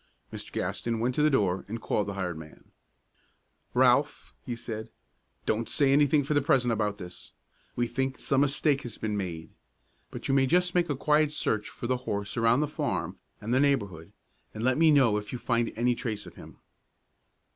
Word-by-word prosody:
Mr. - - -7
Gaston 115 -1 -2
went 120 +3 0
to 150 - 0
the 155 - +5
door 95 -9 +1
and 115 +3 -5
called 105 -2 -1
the 100 - -4
hired 90 -3 -3
man. 80 -1 -13 1.0
"Ralph," - - +3
he 120 - -4
said, 110 -1 -6 0.6
"don't 110 +1 -1
say 140 -2 +3
anything 145 +1 +4
for 145 - -1
the 145 - +3
present 130 -4 +2
about 105 -2 -1
this. 90 -3 -10 0.4
We 120 - +1
think 130 +2 -2
some 135 0 +1
mistake 145 0 +1
has 120 - -8
been 105 -1 -2
made. 85 -5 -5 0.6
But - - -6
you - - +1
may 135 -1 +4
just 180 +3 +2
make 175 -2 +2
a 145 - 0
quiet 150 +2 +2
search 110 -8 -1
for - - -8
the 125 +1 +1
horse 100 -5 -4
around 115 +3 +3
the 150 - +1
farm 150 - -3 0.2
and 110 +3 -3
the 130 - +4
neighborhood, 100 - 0 0.4
and 110 - -4
let 130 +3 +2
me 165 -1 +6
know 130 -8 +4
if 105 0 -5
you 125 - -3
find 120 -1 0
any 120 +2 +2
trace 110 -4 -4
of - - -11
him. - - -13
120 Hz, 195 wpm, -28 LUFS, 105-140 Hz, 1.0 s, me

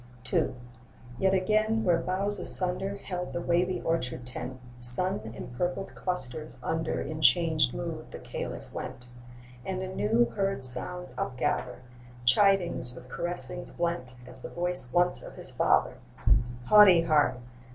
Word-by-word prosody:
II. - - +1 0.6
Yet 190 0 +3
again, 215 +3 +1
where 175 -2 +3
boughs 195 +4 0
asunder 190 +2 -1
Held 180 -3 -6
the - - -2
wavy 175 +2 0
orchard 125 -7 -2
tent, 125 +1 -5 0.2
Sun 125 - +6 0.2
empurpled 175 +9 -4
clusters 155 -4 -4
under 160 0 -2
In 155 0 -5
changed 155 -1 +3
mood 165 -1 -6
the - - -8
Caliph - - -7
went; 125 - -7 0.6
And 190 -1 -4
anew 120 - +1
heard 195 -8 -1
sounds 180 +8 +2
upgather, 125 -1 -2 0.4
(Chidings 175 -4 +3
with 125 - -12
caressings 175 +6 +1
blent, 170 -8 -3
As 125 +1 -8
the - - -7
voice 175 -7 -1
once 175 +3 +2
of - - -11
his - - -8
father): - - +2 0.7
'Haughty 205 -3 +7
heart! 150 -5 +2
175 Hz, 130 wpm, -28 LUFS, 130-185 Hz, 0.7 s, Haughty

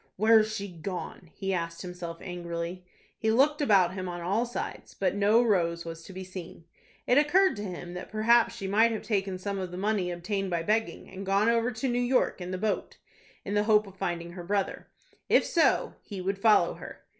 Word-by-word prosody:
"Where's 215 +1 +5
she 200 -2 -4
gone?" 180 -1 -7
he 195 0 -2
asked 170 -1 -3
himself, 180 -2 -6
angrily. 175 0 -5 0.4
He 220 - 0
looked 290 +7 +3
about 195 -9 +4
him 185 -1 -4
on 175 0 -5
all 200 +8 0
sides, 240 - -6
but 190 -2 0
no 210 +4 +4
Rose 170 -6 +1
was 165 0 -7
to - - -10
be 190 0 -7
seen. 180 -3 -9 0.4
It 250 +3 +5
occurred 370 +6 +4
to 205 - -4
him 175 -2 -6
that 180 - -7
perhaps 225 +2 +3
she 195 - -5
might 220 +4 +4
have 220 - -4
taken 195 -3 -1
some 195 +1 -4
of 185 -1 -4
the 180 - -7
money 200 -2 0
obtained 190 +3 -3
by 170 -2 -1
begging, 220 +5 -1
and 190 +1 -8
gone 200 +3 +2
over 230 +1 +2
to 225 +5 -2
New 245 0 +1
York 245 -5 +1
in 180 - -5
the 185 - -3
boat, 215 +2 -2 0.5
in 200 - -3
the 205 0 +2
hope 215 -1 +4
of 195 -1 -13
finding 170 -2 -3
her 175 0 -8
brother. 195 +2 -2 0.4
If - - +5
so, 330 -2 +2
he 200 -3 -8
would 195 +2 -2
follow 215 +1 +4
her. - - -11
195 Hz, 210 wpm, -28 LUFS, 180-220 Hz, 0.5 s, Where's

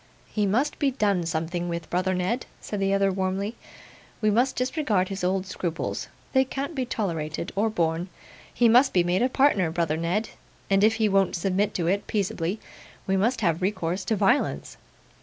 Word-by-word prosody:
'He 210 -2 +1
must 255 +10 0
be 285 - +3
done 200 -9 0
something 170 +2 -2
with, 170 0 -4
brother 185 +1 +1
Ned,' 185 +8 -1
said 205 - -5
the 195 0 +1
other, 195 0 +3
warmly; 190 +3 -2 0.6
'we 215 -1 +2
must 245 +5 +2
disregard 250 - 0
his 195 -1 -5
old 185 +1 +1
scruples; 175 -3 -3 0.3
they 265 -1 +5
can't 275 +4 -4
be 260 -4 -2
tolerated, 170 -6 -3
or 215 +3 +2
borne. 170 -2 -1 0.4
He 240 - +3
must 250 +4 +5
be 180 - +4
made 175 +2 +1
a 250 - +3
partner, 255 - +3
brother 165 -2 0
Ned; 180 +7 -1 0.4
and 195 +1 +4
if 220 +1 +5
he 220 -1 +2
won't 195 -2 +2
submit 195 +3 0
to 170 - -1
it 195 +4 0
peaceably, 195 -1 -1 0.5
we 190 - +1
must 230 +5 +1
have 170 -4 +1
recourse 185 -1 -1
to 220 - +1
violence. 200 +7 +1
195 Hz, 180 wpm, -26 LUFS, 175-225 Hz, 0.6 s, they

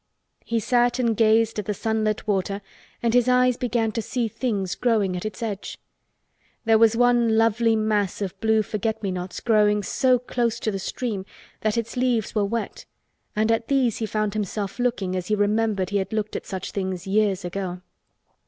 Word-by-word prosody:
He 230 0 -1
sat 245 +2 +2
and 235 -3 +1
gazed 225 0 +3
at 210 - -4
the 210 - -2
sunlit 220 0 -1
water 200 0 -1 0.4
and 230 -1 +2
his 245 0 +4
eyes 250 0 +4
began 235 -2 0
to 230 - -2
see 235 +2 -1
things 205 -5 -2
growing 215 -6 +1
at 180 - -5
its 215 +2 -7
edge. 205 -3 -4 0.9
There 225 -1 +5
was 225 0 +5
one 240 -2 +4
lovely 225 0 +3
mass 210 -3 0
of 195 -3 -3
blue 220 -1 +3
forget 220 +1 -3
me 195 - -1
nots 180 0 -5
growing 210 -2 +3
so 255 +5 +3
close 235 -1 -1
to 215 - 0
the 195 - -3
stream 210 0 -3 0.4
that 215 +1 0
its 230 +1 -3
leaves 245 -4 0
were 210 -2 +1
wet 225 +1 -4 0.5
and 215 +1 +2
at 225 0 0
these 260 -5 +2
he 220 - -2
found 215 -1 -1
himself 205 0 -3
looking 220 -7 0
as 180 -1 -3
he 215 - +2
remembered 205 -2 +1
he 205 - +2
had 190 +2 -2
looked 215 -1 -2
at - - -5
such 190 -1 -5
things 185 -2 -3
years 195 -2 +1
ago. 180 0 -4
215 Hz, 190 wpm, -24 LUFS, 200-230 Hz, 0.9 s, There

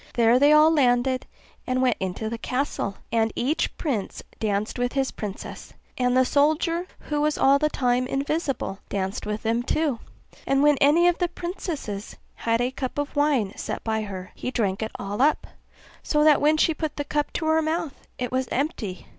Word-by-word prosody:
There 235 +1 +5
they 285 +2 +6
all 305 +1 +7
landed, 255 -2 +2 0.4
and 255 0 0
went 255 -2 +2
into 190 +3 -3
the 230 +1 -4
castle, 250 -7 -2 0.2
and 225 -1 +2
each 285 +7 -1
prince 245 - -3 0.2
danced 215 +2 -1
with 245 0 0
his 270 -1 0
princess; 205 -2 -7 0.2
and 250 0 +1
the 260 - +5
soldier, 315 +5 +1 0.2
who 295 0 +1
was 300 0 +1
all 275 +1 +5
the 305 +1 +2
time 250 -2 +1
invisible, 275 - -2
danced 195 +1 -3
with 210 0 -3
them 230 +1 +1
too; 280 -1 0 0.5
and 275 +1 +3
when 295 -2 +4
any 320 +5 +5
of 350 - +2
the 355 - +2
princesses 335 - -5 0.2
had 230 0 0
a 250 +1 0
cup 260 0 -5
of 290 +1 -3
wine 280 -9 +2
set - - -5
by 220 -1 -1
her, 190 -2 -7
he - - -5
drank 205 -6 -1
it 220 - -2
all 200 +4 -3
up, 300 +2 +3 0.6
so 300 -1 +1
that 305 -1 +5
when 305 +2 +4
she 325 - +3
put 310 -1 -4
the 290 - -2
cup 295 0 -1
to 320 - -2
her 315 0 +3
mouth 320 -1 -3
it 250 -1 -3
was 260 0 0
empty. 245 - -3
260 Hz, 190 wpm, -25 LUFS, 225-300 Hz, 0.6 s, all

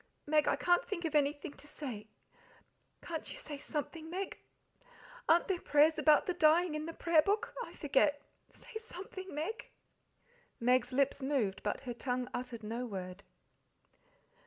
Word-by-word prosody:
"Meg, 300 0 +3
I - - +4
can't 350 0 +3
think 355 -5 -4
of 320 - -2
anything 290 -1 +1
to 295 - -14
say. 245 -9 -6 1.0
Can't 325 -2 -5
you - - -7
say 290 -2 -7
something, 315 +2 -4
Meg? 380 +3 -4 0.9
Aren't 335 +2 +5
there 380 - +1
any - - -17
prayers 300 +2 +4
about 305 -2 +5
the 360 - 0
dying 340 0 +4
in 305 +1 -3
the - - -3
Prayer 335 -2 +4
Book? 405 +5 0
I - - -10
forget. 285 0 +2 0.3
Say - - -9
something, 375 -2 -8
Meg!" 330 +10 -4 0.9
Meg's 250 +1 +3
lips 275 +2 +2
moved, 260 -8 0
but 210 - -2
her 250 -3 -4
tongue 250 +1 -2
uttered 245 -2 -5
no 235 +4 -3
word. 185 -2 -6
295 Hz, 160 wpm, -34 LUFS, 255-335 Hz, 1.0 s, Aren't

